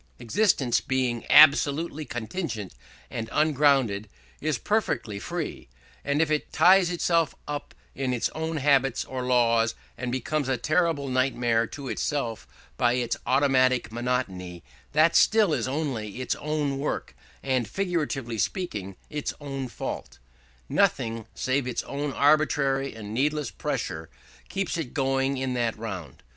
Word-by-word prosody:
Existence, 140 - +2
being 130 -3 -1
absolutely 150 +1 +5
contingent 120 - -4 0.4
and 115 -1 -4
ungrounded, 135 -9 +2 0.3
is 155 -3 0
perfectly 120 - -1
free: - - -5 0.3
and 145 +3 +2
if 155 - -3
it 150 - -1
ties 185 -1 +5
itself 170 -2 +1
up 145 0 -5 0.2
in 135 -1 -2
its 120 -2 0
own 160 0 -3
habits 135 -3 +2
or 130 -1 -5
laws, 115 -2 +2 0.2
and 125 0 -3
becomes 135 +2 -1
a 130 - +1
terrible 155 +2 +1
nightmare 125 -3 +1
to 140 +3 -8
itself 125 -5 -2 0.3
by 120 - +3
its 120 -2 0
automatic 130 -3 +3
monotony, 110 -8 -3 0.3
that 155 +3 +4
still 215 -6 +5
is - - 0
only 130 -7 -3
its 130 - -1
own 150 -2 -1
work 145 - -3 0.3
and, 130 -4 0
figuratively 145 - -2
speaking, 105 - -2
its 150 -1 -4
own 135 -2 -4
fault. 120 - -6 0.5
Nothing 115 -1 +1
save 130 0 0
its 125 - -2
own 145 +1 -3
arbitrary 140 -2 +2
and 105 -1 -7
needless 145 +2 0
pressure 80 0 -4 0.4
keeps 195 -2 -2
it 145 -7 -5
going 135 -1 +1
in 130 -1 -2
that 120 -2 -1
round. 95 - -7
135 Hz, 135 wpm, -26 LUFS, 120-150 Hz, 0.5 s, absolutely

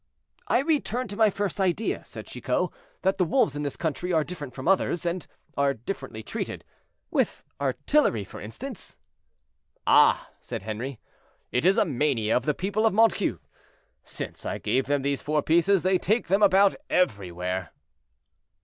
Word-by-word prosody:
"I 245 - +3
return 275 -5 0
to 200 - -5
my 220 0 +5
first 200 -1 -2
idea," 190 +4 0
said - - -9
Chicot, - - -1 0.3
"that 190 +1 +1
the - - +5
wolves 180 - +2
in 145 - -3
this 145 -2 -3
country 170 +2 -2
are 160 -3 +3
different 145 -7 -7
from 130 +2 -5
others, 180 -2 +2
and 175 0 -2 0.3
are 140 -1 +2
differently 120 - -6
treated; - - -5 0.5
with - - 0 0.2
artillery, 285 - +2
for 100 - -10
instance." 220 - -7 0.9
"Ah!" - - +5
said - - -6
Henri, 110 +4 -5 0.5
"it 125 +6 0
is 195 +3 +4
a 220 - +4
mania 130 - +1
of 125 - +1
the 150 -2 +1
people 205 +4 +1
of 210 - 0
Montcuq. 225 +1 +3 0.6
Since - - -6
I - - -3
gave 130 0 0
them 145 -1 +1
these 140 -1 0
four 150 0 0
pieces 170 +4 +3
they 185 0 +3
take 215 -1 0
them 195 +3 +3
about 200 0 +6 0.2
everywhere." 95 - 0
170 Hz, 160 wpm, -26 LUFS, 135-200 Hz, 0.9 s, about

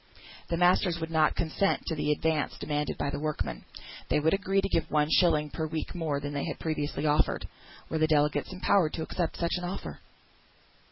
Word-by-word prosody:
The 170 - 0
masters 180 0 +3
could 160 0 -5
not 155 -1 +3
consent 170 +4 0
to 165 - -2
the 150 -1 0
advance 155 0 0
demanded 150 0 -2
by 140 - -1
the - - -3
workmen. 155 0 -3 0.4
They - - +3
would 160 +2 +2
agree 195 0 +1
to - - +1
give - - 0
one 150 0 +2
shilling 150 -4 +3
per 160 -1 -2
week 155 0 -4
more 160 -5 -1
than 145 0 -5
they 140 - -2
had 155 - -4
previously 150 -1 -2
offered. 150 0 +1 0.4
Were 160 - -2
the 155 - +4
delegates 150 +1 +2
empowered 185 -3 +2
to 160 - -3
accept 170 +1 -2
such 170 -1 -1
offer? 180 +2 -5
160 Hz, 190 wpm, -29 LUFS, 150-170 Hz, 0.4 s, the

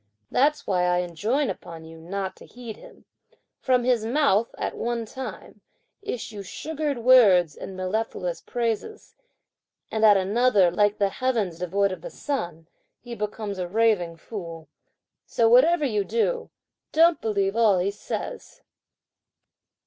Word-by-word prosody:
That's 295 +3 +2
why 180 -2 +1
I 180 0 +2
enjoin 210 - -1
upon 165 -1 -10
you 165 0 -12
not 190 +3 -4
to - - -14
heed 235 -3 -9
him. - - -16 0.5
From 255 -2 +2
his 245 -3 +2
mouth, 230 -3 +2
at - - -3
one 235 -1 -2
time, 260 +4 -8 0.4
issue 230 - -5
sugared 300 +7 -4
words 210 - +5
and 190 - -8
mellifluous 185 -2 -3
phrases; 240 - -3 0.8
and 220 0 -1
at 210 -2 +7
another, 200 -1 +3
like 205 +3 +2
the 200 -1 +2
heavens 215 -8 -1
devoid 195 +3 0
of 185 - -6
the - - -7
sun, 175 - -4 0.3
he 240 -1 -9
becomes 210 -2 -4
a 180 - -2
raving 195 -5 +1
fool; 165 -4 -8 0.6
so 230 - +2
whatever 295 +7 +5
you 210 -6 0
do, 235 - -1 0.4
don't 330 0 +4
believe 200 -2 0
all 220 -4 +4
he 185 +3 0
says." 205 - -7
215 Hz, 140 wpm, -25 LUFS, 185-250 Hz, 0.8 s, at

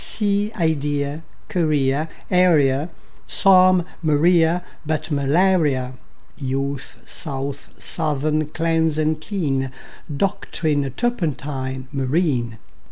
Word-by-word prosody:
Sea, 205 0 +1
idea, 145 -3 -1 0.2
guinea, 150 -3 +1 0.2
area, 155 -5 +3 0.4
Psalm; 185 -2 +5 0.2
Maria, 165 +2 +3 0.2
but 155 +1 -2
malaria; 145 -3 +2 0.4
Youth, 135 0 -4
south, 140 -2 -5
southern; 155 -1 -1
cleanse 160 -1 +1
and 155 0 0
clean; 140 -9 -1 0.5
Doctrine, 155 -7 0
turpentine, 140 - -2
marine. 135 -4 0
155 Hz, 80 wpm, -21 LUFS, 140-170 Hz, 0.5 s, Psalm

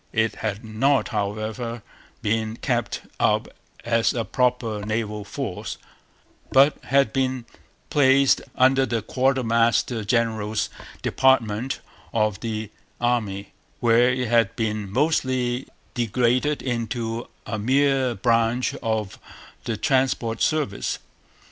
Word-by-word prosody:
It 115 -1 +1
had 110 0 -3
not, 135 +6 +1
however, 110 +2 -3 0.4
been 110 +1 0
kept - - -1 0.2
up - - +2 0.4
as 115 0 +2
a 115 -2 -1
proper 125 -4 0
naval 105 -1 -2
force, - - -5 0.7
but 140 +3 +6
had 135 -4 +3
been 130 -2 0 0.5
placed 135 -1 +4
under 130 +1 +4
the 115 -2 -1
quartermaster 120 -2 +1
general's 110 -1 0 0.3
department 130 -1 +2 0.3
of 110 -3 +1
the 110 -2 -4 0.3
Army, 110 -5 -1 0.3
where 120 +1 +4
it 125 -1 0
had 115 -3 +2
been 110 -3 -2
mostly 130 -2 0 0.3
degraded 125 +4 +1
into 115 -1 -3 0.2
a 110 0 -3
mere 130 +1 +2
branch 115 +1 +1
of 110 -4 -2 0.5
the 115 - -2
transport 130 -3 +1
service. 150 -11 0
115 Hz, 105 wpm, -24 LUFS, 110-130 Hz, 0.7 s, but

